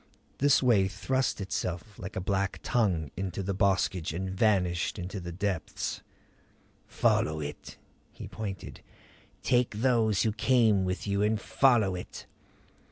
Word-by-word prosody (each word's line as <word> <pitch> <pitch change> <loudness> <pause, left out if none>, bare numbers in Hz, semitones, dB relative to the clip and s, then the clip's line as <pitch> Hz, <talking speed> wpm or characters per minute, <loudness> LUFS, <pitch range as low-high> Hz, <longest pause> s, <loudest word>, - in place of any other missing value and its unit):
This 140 -1 +4
way 105 -7 +4
thrust 115 +8 -1
itself 95 0 -4
like 100 - -7
a - - -1
black 95 0 -1
tongue 90 - +1
into 95 0 -3
the 100 +1 -2
boskage 95 -4 +1
and 95 +3 -3
vanished 95 -4 +1
in 90 -2 -4
the 90 -4 -6
depths. 95 -1 -3 0.9
"Follow 80 0 +1
it." 75 -1 -7 0.3
He - - -9
pointed. 100 -3 -7 0.6
"Take 125 -3 +2
those 115 -6 +3
who 110 - +2
came 110 -3 +3
with 90 0 -3
you 100 0 0
and 105 +1 +2
follow 120 -8 +3
it." 90 - -7
100 Hz, 135 wpm, -29 LUFS, 90-110 Hz, 0.9 s, This